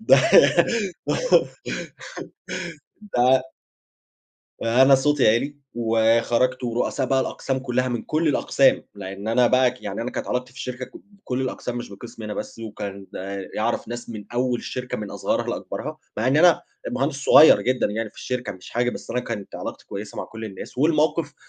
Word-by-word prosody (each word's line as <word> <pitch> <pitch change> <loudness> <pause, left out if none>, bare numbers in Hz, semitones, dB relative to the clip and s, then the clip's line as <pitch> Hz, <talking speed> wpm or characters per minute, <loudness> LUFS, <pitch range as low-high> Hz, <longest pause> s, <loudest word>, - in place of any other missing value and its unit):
ده 220 - +6 3.0
ده 130 +1 +4 1.2
آآ، 115 +3 +4
أنا 135 0 +7
صوتي 135 -2 +3
عِلي 135 +6 +1 0.2
وخرَجت 115 +2 +2
ورؤساء 125 +3 -1
بقى 135 -1 +2
الأقسام 130 0 -2
كلّها 130 0 -1
من 120 -2 -2
كل 155 +1 0
الأقسام 145 - +3
لأن 100 +1 -7
أنا 120 +2 +4
بقى 130 0 +4
ك 125 - -15
يعني - - -4
أنا 125 - -3
كانت - - -4
علاقتي 125 0 -2
في 135 - -13
الشركة 125 0 -5
ك - - -19
بكُلّ 195 -11 -6
الأقسام 125 -1 -3
مش 120 - -5
بقِسمي 115 +2 -10
أنا 105 - -4
بس، - - -6
وكان 100 -3 -7
ده 95 0 -5
يعرَف 115 +1 -1
ناس 120 0 -6
من 105 -3 -7
أول 125 0 0
الشركة 125 0 -5
من 105 -2 -6
أصغرها - - -1
لأكبرها، - - -5 0.2
مع 110 +3 0
إن 135 - +3
أنا 170 +1 +5 0.3
مهندس 135 +3 -1
صغير 155 - +8
جدًا 130 0 +1
يعني 110 +1 -3
في - - -29
الشركة، 125 -5 -3
مش 95 0 -13
حاجة، 120 +1 +1
بس - - -8
أنا 125 +1 0
كانت 110 -5 -6
علاقتي - - -7
كويّسة 100 +1 -7
مع - - -3
كُلّ 110 0 -9
الناس. 100 +3 -8
والمَوقِف 155 +1 +2
125 Hz, 170 wpm, -23 LUFS, 110-130 Hz, 3.0 s, صغير